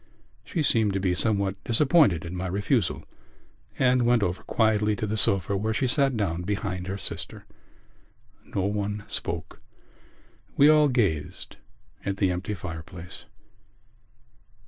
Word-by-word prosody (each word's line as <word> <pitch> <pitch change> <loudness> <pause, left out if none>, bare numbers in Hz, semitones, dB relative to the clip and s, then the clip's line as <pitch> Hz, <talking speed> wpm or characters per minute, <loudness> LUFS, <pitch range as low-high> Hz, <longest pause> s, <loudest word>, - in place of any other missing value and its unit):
She 160 - -2
seemed 110 -7 +2
to 95 - 0
be 95 -2 +1
somewhat 100 0 0
disappointed 120 - +3
at 85 - -6
my 90 +1 -3
refusal 100 - 0 0.7
and 125 -1 +3
went 120 -2 +3
over 90 -1 -2
quietly 105 -2 +1
to 110 - -3
the 105 +1 -2
sofa 100 -2 +2
where 110 +3 -1
she 130 - +1
sat 135 -1 +2
down 90 -5 -1
behind 95 -1 -3
her 95 +1 -3
sister. - - -6 1.0
No 95 - -3
one 105 +1 -2
spoke: - - -4 1.0
we 145 +2 +7
all 150 -1 +6
gazed 100 - -1 0.5
at 100 0 -2
the 95 -2 +2
empty 90 +4 -3
fireplace. 90 0 -8
100 Hz, 135 wpm, -26 LUFS, 95-115 Hz, 1.0 s, we